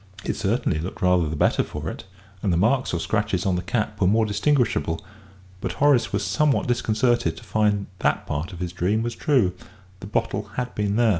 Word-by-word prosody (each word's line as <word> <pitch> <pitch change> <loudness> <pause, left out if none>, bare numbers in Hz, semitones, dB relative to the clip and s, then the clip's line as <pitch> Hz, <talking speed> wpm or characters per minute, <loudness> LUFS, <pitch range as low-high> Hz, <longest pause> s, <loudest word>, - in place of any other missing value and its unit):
It - - -1
certainly 105 -5 0
looked 90 +4 -5
rather 90 -3 +3
the 80 - -3
better - - +3
for - - -5
it, - - -6 0.4
and 100 - +1
the 85 - +2
marks 125 +8 +2
or 85 - -1
scratches 105 -1 -1
on 95 -2 +2
the 90 - -1
cap 105 +2 -2
were 90 - +4
more 110 +3 +3
distinguishable, 105 - +1 0.5
but - - -3
Horace 140 -4 +3
was 100 0 -1
somewhat 140 +10 +2
disconcerted 120 0 +1
to - - -11
find 105 -2 +1
that - - +1
part 75 +4 -3
of 90 -1 -9
his 90 -1 -3
dream 100 +5 0
was 120 0 -2
true 115 -10 +2 0.5
the 95 - -8
bottle 105 0 -2
had 125 0 -3
been 105 -1 -1
there. 120 0 +4
105 Hz, 205 wpm, -24 LUFS, 90-120 Hz, 0.5 s, were